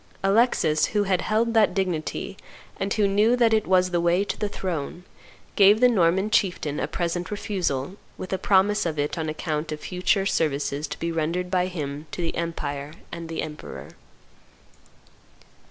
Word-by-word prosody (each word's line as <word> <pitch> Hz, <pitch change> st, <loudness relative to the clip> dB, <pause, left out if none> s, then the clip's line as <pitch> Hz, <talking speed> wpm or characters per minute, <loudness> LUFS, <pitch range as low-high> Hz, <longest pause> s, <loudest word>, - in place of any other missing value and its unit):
Alexis, 195 Hz, -7 st, +3 dB
who 205 Hz, -, +4 dB
had 190 Hz, -2 st, +1 dB
held 225 Hz, +2 st, +1 dB
that 215 Hz, -5 st, +4 dB
dignity 185 Hz, 0 st, -2 dB, 0.4 s
and 195 Hz, +1 st, -2 dB
who 210 Hz, -2 st, +3 dB
knew 210 Hz, +5 st, +3 dB
that 235 Hz, -2 st, +3 dB
it 215 Hz, -1 st, +2 dB
was 185 Hz, 0 st, +3 dB
the 175 Hz, -1 st, +1 dB
way 175 Hz, +3 st, +3 dB
to -, -, -3 dB
the 210 Hz, -, -2 dB
throne, 175 Hz, -3 st, -4 dB, 0.5 s
gave 205 Hz, +2 st, +6 dB
the 250 Hz, -, +6 dB
Norman 190 Hz, -2 st, +2 dB
chieftain 175 Hz, -8 st, +1 dB
a -, -, -1 dB
present 175 Hz, 0 st, -2 dB
refusal, 185 Hz, -6 st, -2 dB, 0.2 s
with 185 Hz, -, -6 dB
a 190 Hz, -, -1 dB
promise 200 Hz, +2 st, +3 dB
of 155 Hz, -2 st, -3 dB
it 145 Hz, 0 st, -1 dB
on 160 Hz, -2 st, -3 dB
account 155 Hz, 0 st, -3 dB
of 155 Hz, -, -4 dB
future 185 Hz, +4 st, 0 dB
services 150 Hz, -4 st, 0 dB
to -, -, -6 dB
be 170 Hz, 0 st, -2 dB
rendered 165 Hz, +3 st, -2 dB
by 180 Hz, -1 st, +2 dB
him 150 Hz, -4 st, -5 dB
to -, -, -8 dB
the 170 Hz, -1 st, -2 dB
empire 150 Hz, -3 st, -4 dB, 0.2 s
and 170 Hz, -1 st, -7 dB
the 165 Hz, -, -3 dB
emperor. 150 Hz, -1 st, -8 dB
180 Hz, 170 wpm, -25 LUFS, 155-200 Hz, 0.5 s, gave